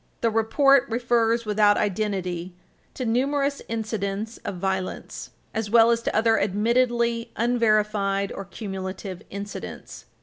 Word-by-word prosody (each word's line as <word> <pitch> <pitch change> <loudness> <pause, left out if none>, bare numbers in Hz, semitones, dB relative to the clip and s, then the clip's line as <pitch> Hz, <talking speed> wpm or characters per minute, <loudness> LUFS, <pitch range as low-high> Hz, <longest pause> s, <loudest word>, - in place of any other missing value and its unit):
The 230 - +2
report 275 +5 +4
refers, 235 -1 +1
without 210 -1 +4
identity, 185 -4 -2 0.4
to 255 - -3
"numerous 275 +4 0
incidents 220 -1 -3
of 195 - -6
violence," 190 0 -3 0.2
as 220 -2 -2
well 230 +1 +6
as 235 0 +1
to - - -2
other 225 +1 +3
admittedly 235 +3 +1
unverified 210 -4 +1
or 195 - -6
cumulative 190 -2 -6
incidents. 200 +1 -8
220 Hz, 115 wpm, -25 LUFS, 200-235 Hz, 0.4 s, well